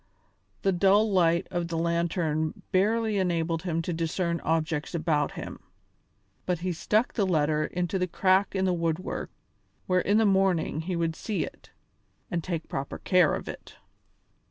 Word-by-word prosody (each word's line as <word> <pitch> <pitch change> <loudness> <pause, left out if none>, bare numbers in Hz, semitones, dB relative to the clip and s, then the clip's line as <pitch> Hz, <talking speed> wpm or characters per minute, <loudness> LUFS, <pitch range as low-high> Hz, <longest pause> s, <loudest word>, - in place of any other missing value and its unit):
The 195 - +3
dull 200 +4 +4
light 170 -3 +3
of 175 -1 -1
the 165 -1 -3
lantern 165 -2 -1
barely 215 +2 +2
enabled 165 -3 0
him 165 -3 -2
to 175 - -2
discern 170 +1 -1
objects 160 0 -1
about 155 -3 0
him, - - -7 0.9
but 180 -1 +1
he 180 0 -1
stuck 215 +8 +1
the 205 -4 +1
letter 155 -3 +2
into 180 +1 -2
a 180 - +1
crack 190 +3 +2
in 190 0 +1
the 185 - +2
woodwork 165 0 -2 0.6
where 185 -1 +2
in 205 +3 +2
the 225 - +4
morning 190 -6 +2
he 180 +2 -3
would 165 -1 -1
see 210 +2 -2
it - - -13 0.6
and 170 -3 -1
take 165 -2 -3
proper 135 0 -4
care 180 -4 +3
of - - -6
it. - - -9
175 Hz, 160 wpm, -27 LUFS, 165-190 Hz, 0.9 s, dull